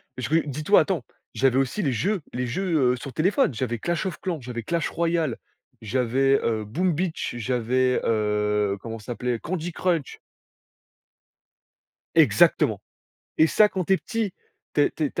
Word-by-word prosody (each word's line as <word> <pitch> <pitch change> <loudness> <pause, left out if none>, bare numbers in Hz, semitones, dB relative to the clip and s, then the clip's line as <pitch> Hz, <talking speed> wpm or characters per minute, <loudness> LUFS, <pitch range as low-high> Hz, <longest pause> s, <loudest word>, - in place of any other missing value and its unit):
parce 125 -2 -4
que 160 +1 +2
dis-toi, 155 +8 +3
attends, 175 - -2 0.3
j'avais 130 -1 +2
aussi 135 +10 0
les 145 -8 +1
jeux 190 - 0
les 125 0 -2
jeux, 150 -3 +1
heu, - - -1
sur 135 +1 -8
téléphone, 190 - +2
j'avais 120 0 -2
clash 170 - -2
of 185 -4 -3
clan, 170 -6 -3
j'avais 120 -1 -6
clash 170 +5 -1
royal, 165 -6 0 0.4
j'avais, 130 +4 +2
heu, 110 -2 -1
boom 170 - 0
beach, 165 -5 -2
j'avais, 125 +2 +1
heu, 105 -2 +1
comment 115 -1 -6
ça 105 - -16
s'appelait? 120 -1 -2
Candy 175 +2 -4
Crunch. 170 -4 -1 2.0
Exactement, - - +4 0.6
et 160 - +6
ça 210 +6 +5
quand 185 -3 -3
tu 195 - +1
es - - +6
petit, 225 -1 -3 0.4
tu - - +3
es - - +3
tu 155 - -3
es 145 - -1
tu - - -4
135 Hz, 170 wpm, -25 LUFS, 120-170 Hz, 2.0 s, et